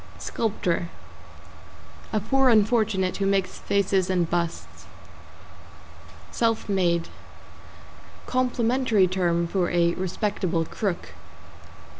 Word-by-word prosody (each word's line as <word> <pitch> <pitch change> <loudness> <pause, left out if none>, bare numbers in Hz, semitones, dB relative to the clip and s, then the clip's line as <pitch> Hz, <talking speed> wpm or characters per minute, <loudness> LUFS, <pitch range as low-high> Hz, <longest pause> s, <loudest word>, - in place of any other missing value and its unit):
=SCULPTOR= 180 -6 -2 1.2
A 215 - +1
poor 265 +5 +2
unfortunate 215 -4 +2
who 195 - 0
makes 195 -1 0
faces 195 -2 +1
and 180 -3 +1
busts. 170 -1 -3 1.4
=SELF 225 -1 0
MADE= 175 -4 +1 1.2
Complimentary 250 -4 +2
term 175 -2 0
for 175 0 0
a 170 -1 +2
respectable 185 -2 -1
crook. 195 0 -3
195 Hz, 85 wpm, -25 LUFS, 175-220 Hz, 1.4 s, poor